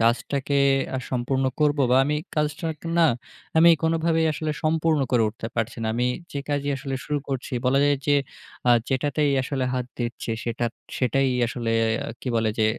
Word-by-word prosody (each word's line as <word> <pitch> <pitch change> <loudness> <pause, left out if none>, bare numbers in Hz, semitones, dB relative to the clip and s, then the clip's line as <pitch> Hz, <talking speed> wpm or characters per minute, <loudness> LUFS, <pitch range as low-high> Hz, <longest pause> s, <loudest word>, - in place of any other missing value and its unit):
কাজটাকে 130 +5 +1 0.4
আ - - -1
সম্পূর্ণ 130 +1 0 0.2
করবো, 145 -1 +3
বা 130 - +5
আমি 150 +2 0 0.2
কাজটা 150 +1 -1
অনেকটা 160 +1 -5
না, 165 - +6 0.5
আমি 170 +1 +8
কোনভাবেই 165 0 +2
আসলে 155 +1 -3
সম্পূর্ণ 160 -1 +2
করে 120 - +4
উঠতে 115 +1 -7
পারছি 115 0 -2
না। 110 - -1
আমি 125 +1 +1 0.3
যে 140 - -3
কাজই 145 -1 -1
আসলে 135 0 -4
শুরু 150 -1 -1
করছি, 135 -1 -4
বলা 135 +2 +3
যায় 145 0 +3
যে, 145 - +4 0.5
আ - - +7 0.2
যেটাতেই 145 +2 +1
আসলে 130 -1 -2
হাত 125 -1 -2
দিচ্ছি, 120 -1 -3
সেটা 120 0 -2 0.3
সেটাই 135 +2 +2 0.2
আসলে 115 0 -3 0.5
কি - - -5
বলে 110 -1 +2
যে, 110 - +3
140 Hz, 175 wpm, -24 LUFS, 125-150 Hz, 0.5 s, আমি